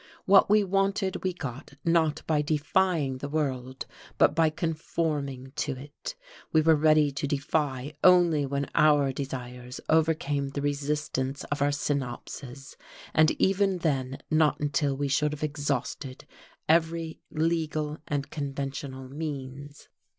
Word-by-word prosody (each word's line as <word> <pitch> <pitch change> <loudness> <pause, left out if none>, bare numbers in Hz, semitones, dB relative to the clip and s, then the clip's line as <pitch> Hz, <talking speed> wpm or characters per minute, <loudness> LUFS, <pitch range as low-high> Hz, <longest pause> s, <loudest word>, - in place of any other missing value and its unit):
What 195 +1 +6
we 210 0 +5
wanted 195 0 0
we 185 - +1
got 140 -4 -7
not 160 -2 +2
by 155 -2 +2
defying 150 -2 +1
the 145 - -5
world, 130 -4 -2 0.3
but 145 - +5
by 160 0 +3
conforming 150 -5 -3
to 145 -1 -1
it: 145 - -8 0.4
we 160 - +4
were 160 +1 +5
ready 155 -1 +4
to 140 +1 -3
defy 145 -1 -1
only 175 -5 +6
when 140 +1 -1
our 145 -3 +4
desires 125 -2 -6
overcame 155 -3 +2
the 140 +1 -4
resistance 145 -1 -2
of 145 - -1
our 145 - +4
synapses, 135 -1 -4 0.4
and 155 0 +5
even 195 0 +2
then 135 -6 -1
not 155 -1 +3
until 145 -1 0
we 145 0 -1
should 150 +2 +1
have 150 - -6
exhausted 145 -2 -3 0.4
every 165 0 +1
legal 155 -1 -1
and 140 -1 -2
conventional 135 -2 -5
means. 140 -1 -7
145 Hz, 130 wpm, -28 LUFS, 140-160 Hz, 0.4 s, What